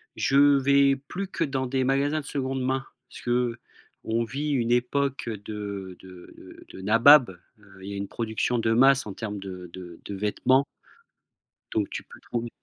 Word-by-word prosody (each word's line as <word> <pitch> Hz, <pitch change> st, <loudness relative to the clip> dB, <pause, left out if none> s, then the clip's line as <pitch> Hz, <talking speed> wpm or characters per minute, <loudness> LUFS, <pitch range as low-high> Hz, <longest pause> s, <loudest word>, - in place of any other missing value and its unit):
je 135 Hz, -, +1 dB, 0.2 s
vais 140 Hz, 0 st, +4 dB
plus 195 Hz, +2 st, -4 dB
que 175 Hz, -, -2 dB
dans 135 Hz, -3 st, -2 dB
des 130 Hz, +1 st, 0 dB
magasins 140 Hz, +4 st, +1 dB
de -, -, -14 dB
seconde 135 Hz, -2 st, -3 dB
main. 130 Hz, +1 st, -1 dB, 0.2 s
Parce -, -, -11 dB
qu'on 120 Hz, -1 st, -3 dB
vit 145 Hz, +5 st, -3 dB
une 120 Hz, -3 st, 0 dB
époque 135 Hz, +2 st, 0 dB
de 100 Hz, -3 st, -6 dB
de 90 Hz, -1 st, -14 dB
de 95 Hz, -, -10 dB
nabab. 115 Hz, +4 st, +6 dB, 0.3 s
Heu, 95 Hz, -2 st, -18 dB
il 100 Hz, -, -7 dB
y 100 Hz, -, -5 dB
a -, -, -5 dB
une 100 Hz, 0 st, -4 dB
production 115 Hz, +1 st, -1 dB
de 115 Hz, 0 st, +1 dB
masse 135 Hz, 0 st, +4 dB
en 100 Hz, -, -6 dB
termes 105 Hz, -1 st, -5 dB
de 90 Hz, -2 st, -8 dB
de 90 Hz, -2 st, -10 dB
de -, -, -6 dB
vêtements 130 Hz, +7 st, +2 dB, 1.1 s
donc 105 Hz, -3 st, 0 dB
tu -, -, -6 dB
peux -, -, -15 dB
trouver. 120 Hz, 0 st, -4 dB
120 Hz, 175 wpm, -26 LUFS, 105-135 Hz, 1.1 s, nabab